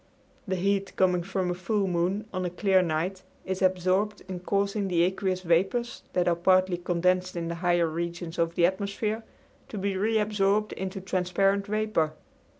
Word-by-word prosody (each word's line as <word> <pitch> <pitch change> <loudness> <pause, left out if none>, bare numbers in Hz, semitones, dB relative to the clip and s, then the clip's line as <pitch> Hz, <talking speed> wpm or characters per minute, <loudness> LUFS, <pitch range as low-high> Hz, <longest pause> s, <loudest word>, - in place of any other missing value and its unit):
The 190 - 0
heat 195 +2 0
coming 180 -1 +3
from 185 0 -2
a - - 0
full 195 +3 -1
moon 180 +4 0
on 185 - -2
a 180 - -1
clear 190 +1 +3
night 180 +3 -1 0.2
is 190 0 -3
absorbed 185 +3 +1
in 185 -2 -5
causing 200 +2 0
the 170 -2 +2
aqueous 185 0 -1
vapors 190 +8 +1
that 180 -1 +1
are 175 - +3
partly 185 +1 +3
condensed 180 +1 0
in 170 -1 -3
the - - -2
higher 175 -1 +3
regions 170 +1 -4
of 165 0 +1
the 170 - +4
atmosphere, 200 +4 -1 0.5
to 215 - -6
be 200 0 -1
reabsorbed 210 0 +1
into 190 0 -5
transparent 195 +2 +1
vapor. 215 -7 0
185 Hz, 165 wpm, -27 LUFS, 175-200 Hz, 0.5 s, the